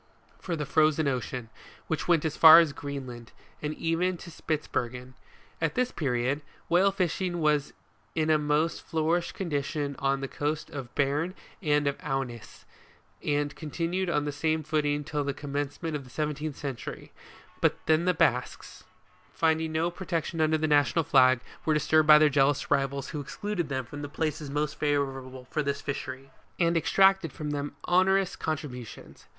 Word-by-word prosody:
for 175 - -3
the 150 -2 -3
Frozen 155 0 +3
Ocean, 125 -3 -3 0.3
which 160 - -3
went 165 -3 +3
as 155 - -1
far 160 0 +10
as 160 -4 +2
Greenland, 130 -5 -7 0.3
and 150 0 -3
even 175 +2 0
to 170 - -10
Spitzbergen. 125 -6 -3 0.5
At 160 -2 0
this 250 0 +1
period, 135 0 -1 0.3
whale 185 +3 +4
fishing 180 -1 -1
was 150 -3 +1 0.4
in 155 0 +2
a 155 - +4
most 150 +2 0
flourishing 165 +2 -1
condition 145 -4 -2
on 135 - +1
all 135 - -7
the 135 - -2
coast 150 +3 -3
of 135 -4 -7
Beam 145 +6 0 0.3
and 150 -4 +2
of 140 0 -1
Aunis, 130 -5 -5 0.6
and 145 0 0
continued 170 +4 -2
on 150 -3 +1
the 145 - -1
same 155 +2 0
footing 150 -1 0
till 150 0 -2
the 140 -1 -2
commencement 145 +3 -4
of 145 - -4
the 125 - -15
seventeenth 150 +1 -3
century; 135 -4 -6 0.5
but - - +3
then 160 +2 +3
the 180 - +3
Basques, 135 -7 -1 0.5
finding 160 0 +1
no 165 +2 0
protection 170 -2 -3
under 155 0 +3
their 155 0 0
national 150 +2 +3
flag, 130 -3 +5 0.2
were 155 - +2
disturbed 150 +1 +3
by 150 -1 +10
jealous 140 -1 +2
rivals, 140 -1 0
who 150 - -4
excluded 175 +3 -4
them 130 -2 -2
from 145 +4 -8
the 145 - -5
places 155 -1 -3
most 150 +2 -2
favourable 135 -3 -2
for 155 - 0
the 140 -1 -1
fishery, 135 -1 -6 0.3
and 170 -1 +3
exacted 190 +1 +4
from 150 -1 -5
them 145 0 -4
onerous 190 +1 +3
contributions. 140 -7 -6
150 Hz, 165 wpm, -28 LUFS, 140-160 Hz, 0.6 s, far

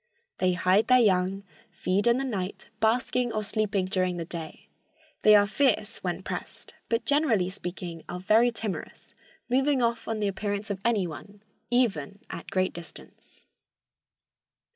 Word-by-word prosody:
"They 185 -1 +3
hide 185 +4 +3
their 255 - +6
young, 195 -3 +2 0.3
feed 195 +5 0
in 235 +1 +5
the 270 - -1
night, 200 -7 -4
basking 240 +2 +1
or 215 -1 -2
sleeping 205 -2 0
during 185 -1 0
the 170 - -4
day. 170 +4 -8 0.5
They 215 0 +7
are 205 -1 +6
fierce 265 +7 0
when - - -2
pressed, - - -7 0.2
but 230 +1 0
generally 235 - +2
speaking 175 -3 -6
are 180 - -4
very 220 +6 +4
timorous, 225 -4 -6 0.3
moving 265 +1 +2
off 235 0 0
on 225 -1 -2
the 205 - +1
appearance 205 +1 -3
of 195 -1 -4
anyone, 200 -2 -2 0.3
even 200 - +1
at - - -7
a - - -12
great 185 0 +1
distance." 165 - -12
205 Hz, 150 wpm, -27 LUFS, 185-235 Hz, 0.5 s, They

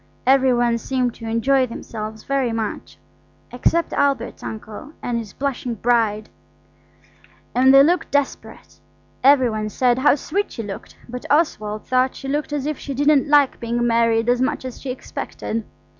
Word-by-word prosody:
Every 265 0 +4
one 240 -1 +2
seemed 250 -1 -1
to 225 - -9
enjoy 255 +4 +2
themselves 220 -2 -7
very 275 -3 0
much, 225 -2 -4 0.5
except 330 +7 0
Albert's 275 -4 0
uncle 220 +7 -8
and 245 - -2
his 220 -3 -8
blushing 260 -3 -3
bride; 220 -1 +1 1.3
and 260 +2 +5
they 275 0 +8
looked 340 +3 +1
desperate. 285 -1 -3 0.4
Every 260 -3 +5
one 215 0 -3
said 245 +2 +1
how 280 +1 +5
sweet 395 +8 -2
she 230 - -5
looked, 200 -2 -8
but 250 +1 -7
Oswald 215 -9 0
thought 255 +1 +1
she 270 - -8
looked 295 +2 -2
as 290 -2 -2
if 305 -2 -3
she 275 - -5
didn't 290 +1 +3
like 290 -2 +4
being 240 +1 -1
married 230 -1 +2
as 245 0 +2
much 260 0 -1
as 255 - -7
she 270 - -6
expected. 230 -3 -5
250 Hz, 160 wpm, -21 LUFS, 230-275 Hz, 1.3 s, they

